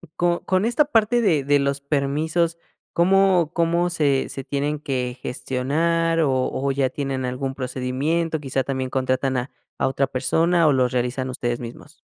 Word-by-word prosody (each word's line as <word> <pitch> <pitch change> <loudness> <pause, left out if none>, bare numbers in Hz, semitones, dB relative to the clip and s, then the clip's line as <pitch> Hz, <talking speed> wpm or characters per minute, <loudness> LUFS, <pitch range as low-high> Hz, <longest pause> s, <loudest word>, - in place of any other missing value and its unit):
co 175 0 0
con 185 +2 +1
esta 240 +6 +3
parte 240 -3 +2
de 160 -11 +2
de 145 +1 +3
los 140 0 0
permisos, 155 +4 0 0.3
¿cómo 180 -2 +3
cómo 170 +1 +1
se 145 -5 +1
se 135 - -6
tienen 145 +2 -2
que 125 -4 -3
gestionar 165 +7 0
o 145 -4 +2 0.2
o 140 +1 -1
ya 135 -1 +1
tienen 135 -2 -3
algún 130 +1 -3
procedimiento? 135 +6 -2
¿Quizá 135 -2 -2
también 130 0 -3
contratan 130 0 0
a 125 +3 -3 0.3
a - - +1
otra 135 +1 0
persona 165 +7 +2
o 145 - +4
los 125 -2 +2
realizan 125 +1 -1
ustedes 120 -1 -2
mismos? 125 +5 -10
140 Hz, 165 wpm, -23 LUFS, 130-165 Hz, 0.3 s, o